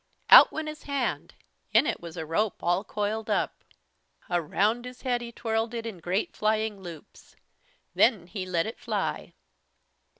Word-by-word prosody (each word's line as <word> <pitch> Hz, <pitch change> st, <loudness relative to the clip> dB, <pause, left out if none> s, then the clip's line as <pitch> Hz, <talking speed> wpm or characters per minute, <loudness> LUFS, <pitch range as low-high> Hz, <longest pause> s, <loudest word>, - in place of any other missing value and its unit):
Out -, -, +11 dB
went 315 Hz, 0 st, -4 dB
his 305 Hz, 0 st, -7 dB
hand. 280 Hz, -3 st, -2 dB, 0.4 s
In -, -, +6 dB
it -, -, -2 dB
was 170 Hz, 0 st, -9 dB
a 160 Hz, -, -4 dB
rope 205 Hz, +7 st, -1 dB
all 175 Hz, +3 st, +1 dB
coiled 210 Hz, +2 st, -3 dB
up. -, -, -1 dB, 0.7 s
Around 205 Hz, +8 st, +1 dB
his 250 Hz, 0 st, -10 dB
head 245 Hz, -2 st, 0 dB
he 235 Hz, 0 st, -7 dB
twirled 225 Hz, 0 st, -2 dB
it, 230 Hz, -1 st, -4 dB
in 215 Hz, -6 st, -6 dB
great 180 Hz, +5 st, -2 dB
flying 215 Hz, -1 st, 0 dB
loops. 170 Hz, -5 st, -12 dB, 0.6 s
Then 215 Hz, -8 st, +3 dB
he 185 Hz, +1 st, -6 dB
let 170 Hz, -2 st, 0 dB
it 225 Hz, -, -6 dB
fly. -, -, -3 dB
215 Hz, 160 wpm, -27 LUFS, 180-235 Hz, 0.7 s, Out